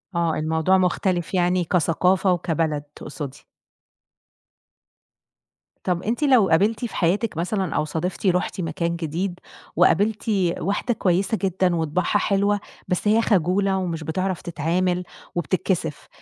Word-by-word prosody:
آه 170 Hz, -2 st, +1 dB
الموضوع 160 Hz, +4 st, +2 dB
مختلف 180 Hz, -1 st, 0 dB
يعني 180 Hz, 0 st, +2 dB
كثقافة 180 Hz, +2 st, +2 dB
وكبلد 160 Hz, -4 st, 0 dB
تقصدي. 145 Hz, -3 st, -8 dB, 2.4 s
طَب 180 Hz, -1 st, -1 dB
أنتِ 235 Hz, +7 st, -1 dB
لو 255 Hz, -9 st, +5 dB
قابلتِ 205 Hz, +9 st, +2 dB
في 235 Hz, -, -7 dB
حياتِك 185 Hz, +3 st, 0 dB
مثلًا 185 Hz, +1 st, -1 dB
أو -, -, +1 dB
صادفتِ 165 Hz, +6 st, -4 dB
رحتِ 180 Hz, +1 st, 0 dB
مكان 170 Hz, +1 st, -2 dB
جديد 175 Hz, +3 st, -3 dB, 0.4 s
وقابلتِ 210 Hz, +4 st, +3 dB, 0.4 s
واحدة 205 Hz, +6 st, -1 dB
كويسة 190 Hz, +1 st, +1 dB
جدًا 185 Hz, -2 st, +1 dB
وطباعها 165 Hz, +2 st, -1 dB
حلوة، 200 Hz, +1 st, +1 dB, 0.3 s
بس 180 Hz, +3 st, -1 dB
هي 220 Hz, +2 st, +4 dB
خجولة 195 Hz, -1 st, +2 dB
ومش 170 Hz, -4 st, -3 dB
بتعرف 185 Hz, +3 st, -2 dB
تتعامل 175 Hz, +3 st, -1 dB, 0.3 s
وبتتكسف، 175 Hz, -2 st, -1 dB
180 Hz, 120 wpm, -23 LUFS, 165-195 Hz, 2.4 s, لو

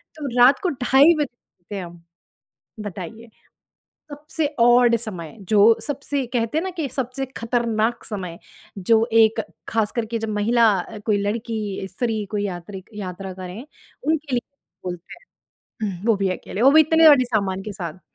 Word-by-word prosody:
तो 295 Hz, -3 st, -5 dB
रात 250 Hz, +3 st, +7 dB
को 365 Hz, -, +2 dB
ढाई 270 Hz, +4 st, +5 dB
बजे 295 Hz, -, +2 dB
गए 175 Hz, -, -49 dB
थे 195 Hz, -, -3 dB
हम, 170 Hz, -1 st, -10 dB, 0.8 s
बताइए? 210 Hz, +3 st, -7 dB, 0.8 s
सबसे 300 Hz, +1 st, -3 dB
ऑड 240 Hz, 0 st, +6 dB
समय, 185 Hz, -6 st, -6 dB
जो 210 Hz, +3 st, +5 dB
सबसे 280 Hz, -1 st, -2 dB
कहते 230 Hz, +4 st, 0 dB
हैं -, -, -4 dB
ना 380 Hz, -, -2 dB
कि 290 Hz, -, 0 dB
सबसे 260 Hz, +1 st, -3 dB
खतरनाक 230 Hz, -1 st, 0 dB
समय, 185 Hz, -6 st, -6 dB, 0.4 s
जो 220 Hz, +4 st, +3 dB
एक 225 Hz, -1 st, +5 dB, 0.3 s
खास 220 Hz, -2 st, 0 dB
करके 230 Hz, 0 st, -2 dB
जब 225 Hz, 0 st, -3 dB
महिला, 210 Hz, -2 st, +3 dB, 0.2 s
कोई 210 Hz, -2 st, +2 dB
लड़की, 210 Hz, -2 st, -3 dB
स्त्री 220 Hz, 0 st, -2 dB
कोई 205 Hz, -1 st, -1 dB
यात्री 190 Hz, +1 st, -6 dB
यात्रा 190 Hz, -1 st, -6 dB
करें, 185 Hz, +7 st, -8 dB, 0.4 s
उनके 305 Hz, -4 st, 0 dB
लिए 240 Hz, -, 0 dB, 0.4 s
बोलते 175 Hz, -1 st, -6 dB, 0.7 s
हैं 205 Hz, -, -1 dB
हुँ, 195 Hz, +6 st, -9 dB
वो 225 Hz, -3 st, +4 dB
भी 195 Hz, -1 st, 0 dB
अकेले, 210 Hz, -, -5 dB
वो 270 Hz, -, +7 dB
भी 315 Hz, -, +8 dB
इतने 320 Hz, +1 st, +6 dB
बड़े 255 Hz, -3 st, +5 dB
सामान 195 Hz, -5 st, -1 dB
के 210 Hz, 0 st, -6 dB
साथ। 180 Hz, -3 st, -7 dB
220 Hz, 160 wpm, -22 LUFS, 195-250 Hz, 0.8 s, भी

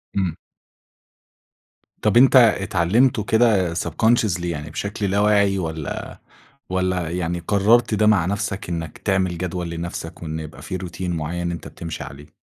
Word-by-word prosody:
امم. 95 Hz, -5 st, -1 dB, 1.6 s
طب -, -, +3 dB
أنت 135 Hz, +2 st, +6 dB
اتعلمته 110 Hz, 0 st, +4 dB
كده 105 Hz, -6 st, +3 dB
subconsciously 105 Hz, -1 st, +1 dB
يعني 75 Hz, -3 st, -4 dB
بشكل 100 Hz, +6 st, -4 dB
لا 100 Hz, -, +2 dB
واعي، 100 Hz, -2 st, +3 dB
والّا 80 Hz, -4 st, -5 dB, 0.5 s
والّا 90 Hz, -2 st, -1 dB
يعني 85 Hz, 0 st, -2 dB
قررت 110 Hz, +4 st, +3 dB
ده 105 Hz, 0 st, +3 dB
مع 100 Hz, -6 st, +4 dB
نفْسك، 100 Hz, 0 st, -3 dB
إنك 80 Hz, -2 st, -4 dB
تعمل 95 Hz, -3 st, 0 dB
جدول 90 Hz, 0 st, -3 dB
لنفْسك 85 Hz, 0 st, -6 dB
وإن 80 Hz, -1 st, -4 dB
يبقى 80 Hz, -1 st, -9 dB
في -, -, -5 dB
روتين 90 Hz, 0 st, -4 dB
معيّن 85 Hz, +2 st, -3 dB
أنت 85 Hz, -3 st, -6 dB
بتمشي 85 Hz, -2 st, -7 dB
عليه؟ 70 Hz, +1 st, -11 dB
90 Hz, 140 wpm, -22 LUFS, 85-105 Hz, 1.6 s, أنت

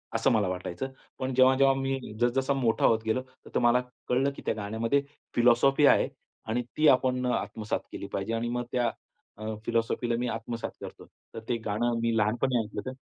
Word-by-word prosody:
असं 115 Hz, +4 st, +3 dB
मला 105 Hz, -4 st, +2 dB
वाटायचं. 90 Hz, +7 st, -4 dB, 0.3 s
पण 130 Hz, 0 st, -2 dB
जेव्हा-जेव्हा 130 Hz, +1 st, +5 dB
मी 135 Hz, 0 st, -1 dB, 0.2 s
जस-जसा 130 Hz, +3 st, +2 dB
मोठा 120 Hz, -5 st, +1 dB
होत 115 Hz, -1 st, +4 dB
गेलो, 110 Hz, +3 st, +1 dB
त 130 Hz, 0 st, -21 dB
तर -, -, +4 dB
मला 120 Hz, +1 st, +4 dB, 0.3 s
कळलं 135 Hz, +3 st, +2 dB
की -, -, -9 dB
त्या -, -, +1 dB
गाण्यामध्ये 110 Hz, +6 st, 0 dB, 0.3 s
फिलॉसॉफी 125 Hz, +4 st, +4 dB
आहे -, -, +5 dB, 0.4 s
आणि 115 Hz, +3 st, 0 dB, 0.2 s
ती 155 Hz, 0 st, +5 dB
आपण 130 Hz, -1 st, +3 dB
आत्मसात 110 Hz, -3 st, -2 dB
केली -, -, -6 dB
पाहिजे 100 Hz, +3 st, -2 dB
आणि 115 Hz, +1 st, -1 dB
मग 120 Hz, 0 st, -1 dB
त्या 120 Hz, -2 st, +1 dB, 0.5 s
अ, 110 Hz, 0 st, -4 dB
फिलॉसॉफीला 115 Hz, +1 st, 0 dB
मी 125 Hz, -, -1 dB
आत्मसात 115 Hz, 0 st, -4 dB
करतो. -, -, -9 dB, 0.3 s
तर -, -, -5 dB
ते 120 Hz, -, +1 dB
गाणं 115 Hz, +3 st, 0 dB
मी 115 Hz, -1 st, +1 dB
लहानपणी 120 Hz, +4 st, +1 dB
ऐकलं 105 Hz, -2 st, -4 dB
होतं. 130 Hz, -, -5 dB
120 Hz, 185 wpm, -28 LUFS, 115-130 Hz, 0.5 s, जेव्हा-जेव्हा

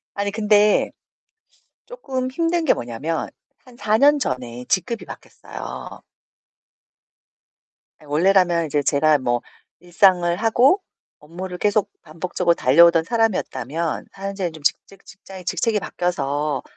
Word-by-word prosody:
아니 200 Hz, 0 st, -1 dB
근데 210 Hz, 0 st, +3 dB, 1.0 s
쪼끔 265 Hz, -, -4 dB
힘든 335 Hz, +4 st, 0 dB
게 -, -, +5 dB
뭐냐면 130 Hz, +8 st, -4 dB, 0.4 s
한 250 Hz, -2 st, -17 dB
4 215 Hz, -2 st, +1 dB
년 290 Hz, +3 st, +5 dB
전에 125 Hz, -, -4 dB
직급이 230 Hz, +4 st, -1 dB
바뀌었어요. -, -, -9 dB, 2.0 s
아 150 Hz, -, -18 dB
원래라면 170 Hz, +2 st, +2 dB
이제 145 Hz, -1 st, -1 dB
제가 150 Hz, +2 st, +3 dB
뭐 120 Hz, -2 st, -1 dB, 0.4 s
일상을 175 Hz, 0 st, +3 dB
하고 240 Hz, -, +3 dB, 0.4 s
업무를 180 Hz, +4 st, -8 dB
계속 210 Hz, 0 st, +1 dB
반복적으로 170 Hz, +2 st, -1 dB
달려오던 165 Hz, +4 st, +5 dB
사람이었다면 165 Hz, -, -2 dB
현재는 195 Hz, -3 st, -4 dB
좀 155 Hz, -1 st, -13 dB
직 145 Hz, -, +3 dB
직 195 Hz, -1 st, -19 dB
직장이 195 Hz, -1 st, -12 dB
직책이 200 Hz, +5 st, 0 dB
바뀌어서 150 Hz, -6 st, -2 dB
180 Hz, 270 characters per minute, -21 LUFS, 155-215 Hz, 2.0 s, 게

